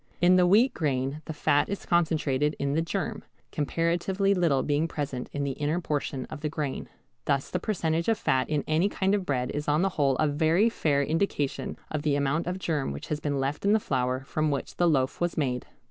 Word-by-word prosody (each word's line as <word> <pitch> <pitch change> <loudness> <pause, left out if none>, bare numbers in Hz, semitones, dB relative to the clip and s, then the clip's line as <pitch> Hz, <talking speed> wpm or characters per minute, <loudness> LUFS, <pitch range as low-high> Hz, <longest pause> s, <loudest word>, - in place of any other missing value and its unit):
In 180 +1 +5
the 180 -1 +5
wheat 220 +8 +5
grain 140 -1 -1
the - - -5
fat 145 -1 +2
is 200 - -4
concentrated 155 -4 +1
in 140 0 -1
the 160 - +2
germ, 200 +6 -3 0.3
comparatively 175 +6 0
little 165 -8 +2
being 150 +2 +1
present 140 -6 -4
in 145 - -2
the 140 - -1
inner 150 +5 -1
portion 145 -5 -2
of 145 - -9
the 150 - -1
grain. 150 -3 -4 0.4
Thus 140 -2 0
the - - 0
percentage 170 -4 -1
of 225 - +2
fat 130 -9 +1
in 150 -2 0
any 160 +6 +2
kind 195 -1 0
of 195 -3 0
bread 125 -3 0
is 145 +1 -4
on 150 +4 +2
the 195 - +2
whole 140 -6 +1
a 155 - +2
very 160 +8 +3
fair 145 -10 +1
indication 155 -2 -1
of 155 - -1
the 145 -2 +1
amount 145 +4 0
of 180 +1 -2
germ 155 - -1
which 70 - -7
has 150 - -1
been 145 -2 -2
left 135 +2 -2
in 200 +1 +4
the 220 - +4
flour 130 -6 -1
from 155 +3 -1
which 140 -2 -3
the 175 -1 +4
loaf 135 -1 0
was 175 0 0
made. 125 -5 -1
150 Hz, 220 wpm, -27 LUFS, 140-175 Hz, 0.4 s, In